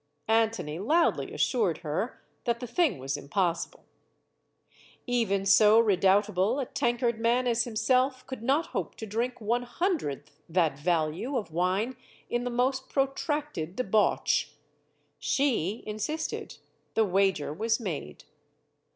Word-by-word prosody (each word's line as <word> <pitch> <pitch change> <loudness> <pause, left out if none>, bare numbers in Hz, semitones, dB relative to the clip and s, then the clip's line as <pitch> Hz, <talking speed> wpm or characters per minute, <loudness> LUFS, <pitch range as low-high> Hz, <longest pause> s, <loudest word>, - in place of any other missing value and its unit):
Antony 220 -8 +1
loudly 315 - +2
assured 215 - +1
her 185 +11 -3 0.2
that 235 -1 0
the 250 - -5
thing 250 - +1
was 135 +2 -3
im 140 -1 -11
possible. 180 -3 -1 1.2
Even 225 -6 0
so 210 +2 +6
redoubtable 200 +2 +3
a 270 - -1
tankard 240 -1 0
man 240 +2 +2
as 235 -1 +2
himself 255 +3 +1
could 260 -4 -7
not 275 +7 +2
hope - - -3
to 220 - -7
drink 235 +4 -2
one 235 +2 0
hundredth 240 - -3
that 160 -5 +1
value 170 - 0
of 210 -8 -3
CLEOPATRA 160 - -14
149 185 +6 +1
wine 255 -1 -13 0.3
in 240 0 0
the - - -1
most 260 +2 0
protracted 275 - -2
debauch. 215 -3 +2 0.7
She 230 - 0
insisted. 215 +10 -4 0.4
The 220 - +4
wager 190 -6 +1
was 220 +7 0
made. 155 - -5
225 Hz, 135 wpm, -28 LUFS, 185-250 Hz, 1.2 s, so